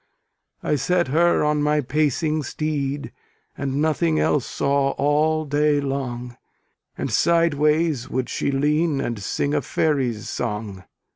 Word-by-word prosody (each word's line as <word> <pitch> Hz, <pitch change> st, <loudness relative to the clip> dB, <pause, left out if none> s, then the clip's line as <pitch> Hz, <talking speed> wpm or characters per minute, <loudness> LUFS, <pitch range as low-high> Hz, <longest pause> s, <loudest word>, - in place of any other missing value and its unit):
I 150 Hz, -, +1 dB
set 170 Hz, +3 st, +1 dB
her 170 Hz, +4 st, +3 dB
on 150 Hz, 0 st, +1 dB
my 150 Hz, +1 st, +2 dB
pacing 155 Hz, +2 st, 0 dB
steed, 145 Hz, -1 st, -3 dB, 0.4 s
And 135 Hz, -1 st, -3 dB
nothing 160 Hz, 0 st, +1 dB
else 145 Hz, -4 st, +1 dB
saw 140 Hz, 0 st, +1 dB
all 155 Hz, +2 st, +2 dB
day 145 Hz, 0 st, +2 dB
long; 125 Hz, -3 st, -4 dB, 0.6 s
And -, -, -3 dB
sideways 155 Hz, -4 st, +2 dB
would 130 Hz, -1 st, -2 dB
she -, -, -2 dB
lean, 150 Hz, +2 st, +1 dB
and 120 Hz, -5 st, -3 dB
sing 140 Hz, +8 st, -1 dB
A -, -, +1 dB
faery's 130 Hz, -9 st, -1 dB
song. 105 Hz, -4 st, -4 dB
145 Hz, 130 wpm, -22 LUFS, 135-155 Hz, 0.6 s, her